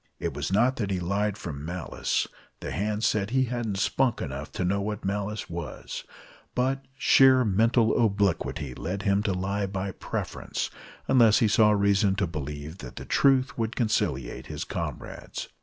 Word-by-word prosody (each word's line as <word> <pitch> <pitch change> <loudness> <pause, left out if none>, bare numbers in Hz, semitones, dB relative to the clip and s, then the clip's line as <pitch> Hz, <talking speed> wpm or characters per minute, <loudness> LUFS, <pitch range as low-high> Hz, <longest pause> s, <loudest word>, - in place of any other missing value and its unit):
It - - -3
was - - -3
not 125 +7 +3
that 105 -4 -1
he 95 -2 0
lied 100 +3 0
from 75 -7 -6
malice 85 +2 -1 0.3
the - - -5
hands 105 +2 -1
said 105 -2 +1
he 130 +2 +2
hadn't 120 -5 -2
"spunk" 120 +5 +1
enough 70 +1 -5
to 90 - -1
know 100 +2 +1
what 105 0 -4
malice 100 +2 -2
was 85 -2 -6 0.5
but 135 +2 0
sheer 130 -2 +6
mental 110 +3 +3
obliquity 95 - 0
led 95 +8 -4
him 100 0 +2
to 105 - 0
lie 100 +2 -1
by 95 0 -3
preference, - - -4 0.4
unless 115 -5 +6
he 115 - +4
saw 105 +1 +5
reason 100 -1 +3
to 100 0 +1
believe 75 +1 -6
that 65 - -9
the - - -7
truth 130 -2 +3
would 115 0 -1
conciliate 110 -4 -1
his - - -4
comrades. - - -5
100 Hz, 165 wpm, -27 LUFS, 95-115 Hz, 0.5 s, sheer